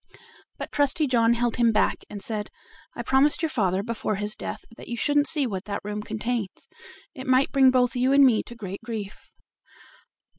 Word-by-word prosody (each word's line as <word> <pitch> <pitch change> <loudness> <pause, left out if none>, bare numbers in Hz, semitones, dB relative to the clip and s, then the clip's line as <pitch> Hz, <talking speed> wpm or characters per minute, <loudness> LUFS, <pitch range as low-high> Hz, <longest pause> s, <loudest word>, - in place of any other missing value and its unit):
But - - -6
Trusty 290 +2 +2
John 235 -3 +3
held 240 0 -1
him 235 -2 +4
back, 215 - +2
and 205 -1 -8
said: 215 -2 -4 0.5
"I - - -4
promised 285 +4 +3
your 320 - +1
father 195 -5 0
before 225 -1 -2
his 210 +2 -3
death - - -7
that - - -12
you 235 - -4
shouldn't 290 +3 +2
see 295 -4 0
what 195 -6 -4
that 200 0 -4
room 210 +1 -4
contains. 220 -1 -4 0.5
It 260 -4 -9
might 260 +1 +3
bring 270 -1 +5
both 250 -1 +2
you 255 +2 +2
and 280 0 +7
me 235 -5 +4
to 240 - -9
great 195 -3 -7
grief." 220 -4 -7
235 Hz, 190 wpm, -25 LUFS, 210-265 Hz, 0.5 s, and